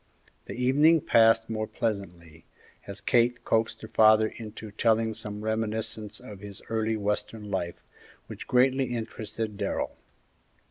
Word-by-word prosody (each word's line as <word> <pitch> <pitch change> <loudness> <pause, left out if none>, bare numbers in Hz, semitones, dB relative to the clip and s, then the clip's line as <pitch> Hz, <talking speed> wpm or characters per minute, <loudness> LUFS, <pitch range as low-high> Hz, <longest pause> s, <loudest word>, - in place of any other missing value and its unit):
The - - -7
evening 145 +6 +4
passed 115 -1 +4
more 110 -1 -3
pleasantly, 85 -7 -4 0.4
as 100 0 -7
Kate 120 0 +2
coaxed 110 0 0
her - - -6
father 110 0 +5
into 110 -1 -9
telling 110 +1 +2
some 105 0 -6
reminiscences 110 -1 -2
of 110 -6 -11
his 100 -1 -9
early 110 0 0
western 105 0 -3
life, 85 -3 -3 0.4
which - - -9
greatly 130 +2 +3
interested 110 -1 -5
Darrell. - - -2
110 Hz, 130 wpm, -27 LUFS, 105-115 Hz, 0.4 s, father